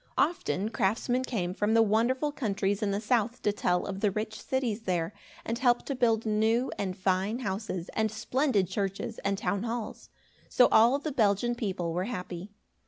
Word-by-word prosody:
Often 220 - +1
craftsmen 235 +5 0
came 180 -8 -2
from 210 +3 +1
the 225 - +6
wonderful 240 +7 +1
countries 200 -7 -1
in 210 - +1
the 200 0 0
south 230 +1 0
to 210 - +3
tell 180 -3 0
of 195 -1 -4
the 210 - +2
rich 215 +2 -4
cities 245 -5 -1
there, 175 0 -1 0.3
and 230 +1 -2
help 245 -2 +3
to 280 - -2
build 230 -3 +2
new 220 +4 +2
and 185 -2 -3
fine 190 +4 0
houses, 195 -6 -3
and 220 0 0
splendid 225 -2 +1
churches, 195 +3 -3
and 200 0 -1
town 200 -1 -1
halls. 230 -1 -5 0.4
So 250 - +5
all 235 +5 +6
the 295 +2 -4
Belgian 230 -2 +2
people 185 -8 -2
were 180 +2 -1
happy. 180 -4 -5
215 Hz, 175 wpm, -29 LUFS, 195-240 Hz, 0.4 s, the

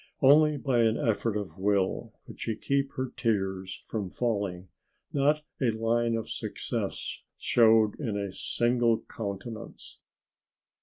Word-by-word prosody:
Only 150 +2 +6
by 130 -3 +1
an 115 -1 +3
effort 110 -1 0
of 95 -5 -6
will 100 -1 0
could - - -12
she 110 - -2
keep 140 +4 0
her 130 -1 -3
tears 95 -4 -1
from 105 -4 -3
falling 100 -6 -2 0.4
not 150 +2 +2 0.2
a 125 - +3
line 115 +1 +1
of 115 - -3
success - - -4 0.2
showed 110 -2 +4
in 115 -8 -2
a 100 -2 -3
single 120 +2 +1
countenance. 110 +1 -7
115 Hz, 125 wpm, -29 LUFS, 100-120 Hz, 0.4 s, Only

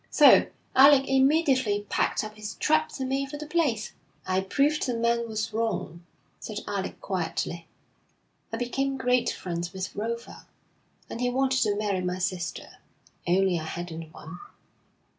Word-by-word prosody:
So - - +7 0.3
Alec 270 0 +7
immediately 265 -6 +2
packed - - 0
up 215 0 -7
his 215 0 -7
traps 310 -1 +1
and 265 - -2
made 270 +1 -1
for 295 - -6
the 300 - -7
place.' 295 -9 0 0.3
'I 185 0 +1
proved 295 +1 +2
the 245 - -1
man 235 0 +1
was 220 0 -3
wrong,' 215 -6 -2 0.4
said - - -6
Alec - - -3
quietly. - - -3 0.8
'I 225 - -3
became 270 +3 -1
great 250 -1 +2
friends 175 0 -4
with 190 0 -5
Rofa, 230 +3 -5 0.6
and 235 - -6
he 250 - +2
wanted 265 +1 +1
to 210 -2 +2
marry 205 -3 -1
my 180 0 -2
sister, 180 -2 -4 0.5
only 185 0 +3
I - - -6
hadn't 165 -1 -6
one.' 160 +1 -10
230 Hz, 150 wpm, -27 LUFS, 185-270 Hz, 0.8 s, So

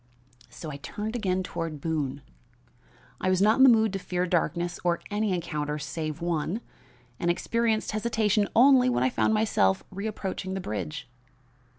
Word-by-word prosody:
"So 155 - -8
I 140 - -6
turned 210 - -5
again 190 -5 0
toward 165 -4 -4
Boone. 145 -3 -2 1.0
I 185 - 0
was 185 -1 +2
not 210 +3 +4
in 265 - +6
the 265 - +9
mood 220 -3 +4
to 195 - -2
fear 180 -1 -1
darkness 175 0 -1
or 175 -1 +1
any 210 0 0
encounter 150 -4 -2
save 155 +1 -4
one, 170 +3 -1 0.6
and 175 - 0
experienced 225 +5 0
hesitation 215 -1 +1
only 255 +1 +6
when 250 - +1
I 260 - +2
found 220 - +2
myself 95 - +2
reapproaching 195 -2 -4
the - - -2
bridge. 100 - -5
185 Hz, 160 wpm, -27 LUFS, 160-215 Hz, 1.0 s, the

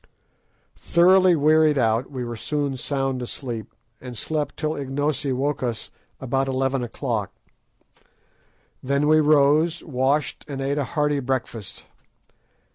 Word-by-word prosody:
Thoroughly 185 +1 +4
wearied 155 0 +4
out, 115 0 +1
we 130 -3 -5
were 120 0 -5
soon 145 +3 -2
sound 135 0 -2
asleep, 120 -2 -5 0.3
and 125 -2 -8
slept 150 +5 -2
till 155 0 -1
Ignosi 140 0 -1
woke 140 +3 -1
us 120 -3 -3 0.3
about 135 +1 -1
eleven 135 0 0
o'clock. 115 -4 -3 1.5
Then 140 +2 0
we 155 +1 +5
rose, 150 +2 +3
washed, 140 +1 0
and 140 -3 -5
ate 140 +2 -1
a - - +1
hearty 150 -1 +2
breakfast. 125 -5 -4
135 Hz, 120 wpm, -23 LUFS, 130-150 Hz, 1.5 s, we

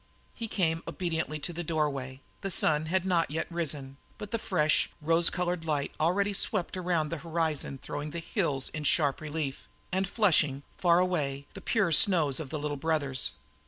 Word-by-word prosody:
He 230 - -5
came 165 -6 0
obediently 160 -4 -2
to 175 - -2
the 175 +1 -4
doorway. 140 -5 -2 0.2
The 195 - -2
sun 155 -3 +2
had 185 +2 +1
not 175 -3 +2
yet 155 +2 -2
risen, 145 -5 -3 0.2
but 210 -1 -7
the 230 - 0
fresh, 155 -7 +2
rose 165 +2 +3
coloured 180 -1 -2
light 150 -3 -1
already 195 +6 +2
swept 195 -2 0
around 175 -4 0
the 165 - -4
horizon 160 -4 -1
throwing 145 +3 -5
the 165 - -6
hills 165 - -1
in 155 - -5
sharp 145 -1 +2
relief 150 -3 -4 0.2
and 190 +1 +1
flushing, 155 - +3
faraway, 170 -6 +2
the - - -9
pure 210 -7 +1
snows 155 -4 +5
of 155 -4 -5
the 155 - -3
Little 145 0 -3
Brothers. 140 -4 0
160 Hz, 170 wpm, -29 LUFS, 150-180 Hz, 0.2 s, snows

